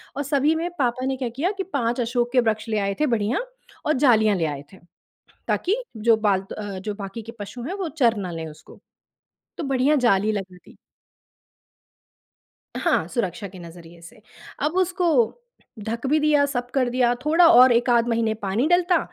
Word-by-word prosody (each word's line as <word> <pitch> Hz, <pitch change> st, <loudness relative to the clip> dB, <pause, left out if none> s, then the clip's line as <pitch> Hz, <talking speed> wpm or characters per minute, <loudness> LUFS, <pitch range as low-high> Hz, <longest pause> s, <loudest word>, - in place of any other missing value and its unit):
और 285 Hz, -, -2 dB
सभी 290 Hz, +2 st, +1 dB
में 335 Hz, +2 st, -2 dB
पापा 255 Hz, 0 st, 0 dB
ने 265 Hz, 0 st, -1 dB
क्या 250 Hz, -3 st, -3 dB
किया 295 Hz, -, -1 dB
कि 385 Hz, -, -2 dB
5 240 Hz, -2 st, 0 dB
अशोक 240 Hz, +1 st, -1 dB
के 250 Hz, -, +5 dB
वृक्ष 215 Hz, +1 st, -3 dB
ले 215 Hz, -, 0 dB
आए 200 Hz, 0 st, -1 dB
थे 305 Hz, -, +3 dB
बढ़िया 215 Hz, +3 st, -1 dB, 0.5 s
और 305 Hz, -, +2 dB
जालियाँ 220 Hz, -4 st, +4 dB
ले 165 Hz, -, 0 dB
आए 145 Hz, -2 st, -4 dB
थे। -, -, -13 dB, 0.7 s
ताकि, 430 Hz, +7 st, 0 dB
जो 225 Hz, +1 st, +3 dB
बालतु 195 Hz, -3 st, -1 dB
अ, 205 Hz, -3 st, -6 dB
जो 205 Hz, +2 st, -5 dB
बाकी 200 Hz, +2 st, -7 dB
के 230 Hz, +2 st, -10 dB
पशु 205 Hz, +4 st, -7 dB
हैं 340 Hz, +10 st, -4 dB
वो -, -, -2 dB
चर 230 Hz, -4 st, +3 dB
ना 185 Hz, -3 st, -4 dB
लें 165 Hz, -1 st, -5 dB
उसको। 155 Hz, +1 st, -15 dB, 0.8 s
तो 325 Hz, -, -3 dB
बढिया 270 Hz, +4 st, +3 dB
जाली 205 Hz, +1 st, +3 dB
लगा 190 Hz, -3 st, -5 dB
दी। -, -, -19 dB, 2.0 s
हाँ, -, -, +1 dB
सुरक्षा 200 Hz, -3 st, -3 dB
के 185 Hz, 0 st, -13 dB
नज़रिये 170 Hz, 0 st, -13 dB
से। 215 Hz, +6 st, -14 dB, 0.4 s
अब 300 Hz, +2 st, +1 dB
उसको 365 Hz, -1 st, +1 dB, 0.8 s
ढ़क 230 Hz, +4 st, -4 dB
भी 305 Hz, +3 st, +3 dB
दिया, 295 Hz, -1 st, +3 dB
सब 245 Hz, -3 st, -4 dB
कर 255 Hz, -2 st, +2 dB
दिया, 245 Hz, -1 st, +2 dB
थोड़ा 330 Hz, +3 st, +5 dB
और 250 Hz, -1 st, +7 dB
1 240 Hz, +1 st, +2 dB
आध 235 Hz, 0 st, +3 dB
महीने 225 Hz, -1 st, 0 dB
पानी 205 Hz, +8 st, 0 dB
डलता 355 Hz, 0 st, +3 dB
235 Hz, 190 wpm, -23 LUFS, 205-275 Hz, 2.0 s, और